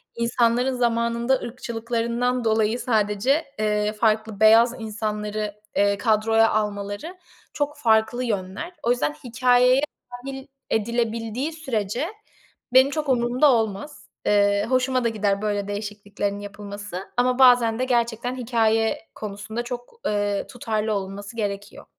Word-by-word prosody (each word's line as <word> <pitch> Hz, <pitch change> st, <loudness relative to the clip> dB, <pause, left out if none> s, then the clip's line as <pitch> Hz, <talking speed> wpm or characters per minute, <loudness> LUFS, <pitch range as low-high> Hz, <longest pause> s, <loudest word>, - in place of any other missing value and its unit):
insanların 235 Hz, +2 st, +1 dB
zamanında 235 Hz, +1 st, +1 dB
ırkçılıklarından 235 Hz, +1 st, -2 dB
dolayı 220 Hz, +1 st, +2 dB
sadece, 220 Hz, +6 st, +1 dB
eee, 210 Hz, 0 st, +1 dB
farklı 220 Hz, -1 st, 0 dB
beyaz 230 Hz, +3 st, +6 dB
insanları, 210 Hz, -1 st, -3 dB, 0.2 s
eee, 200 Hz, 0 st, +3 dB
kadroya 225 Hz, +1 st, +3 dB
almaları 210 Hz, -, -3 dB, 0.4 s
çok 295 Hz, 0 st, -2 dB
farklı 225 Hz, -1 st, +2 dB
yönler. 205 Hz, -, -3 dB
O 235 Hz, -, +2 dB
yüzden 150 Hz, -12 st, 0 dB
hikâyeye 250 Hz, +2 st, +4 dB, 0.3 s
dâhil 265 Hz, +2 st, -7 dB, 0.2 s
edilebildiği 230 Hz, +5 st, -1 dB
sürece 250 Hz, -, -2 dB, 0.7 s
benim 260 Hz, +2 st, +6 dB
çok 300 Hz, -2 st, -2 dB
umurumda 250 Hz, +3 st, +3 dB
olmaz. 225 Hz, +5 st, -3 dB, 0.2 s
Eee, 205 Hz, 0 st, +3 dB
hoşuma 255 Hz, 0 st, +1 dB
da 235 Hz, -, +2 dB
gider 205 Hz, -2 st, 0 dB
böyle 205 Hz, -2 st, -1 dB
değişikliklerin 205 Hz, -1 st, -4 dB
yapılması. 205 Hz, -1 st, -8 dB
Ama 250 Hz, +1 st, +2 dB
bazen 245 Hz, -3 st, +5 dB
de 255 Hz, -, +1 dB
gerçekten 240 Hz, 0 st, 0 dB
hikâye 225 Hz, -2 st, +1 dB, 0.2 s
konusunda 215 Hz, +2 st, -5 dB
çok, 245 Hz, -, -8 dB
eee, 205 Hz, -1 st, -1 dB
tutarlı 220 Hz, -3 st, -2 dB
olunması 200 Hz, +2 st, -5 dB
gerekiyor. 205 Hz, 0 st, -4 dB
225 Hz, 115 wpm, -24 LUFS, 210-245 Hz, 0.7 s, beyaz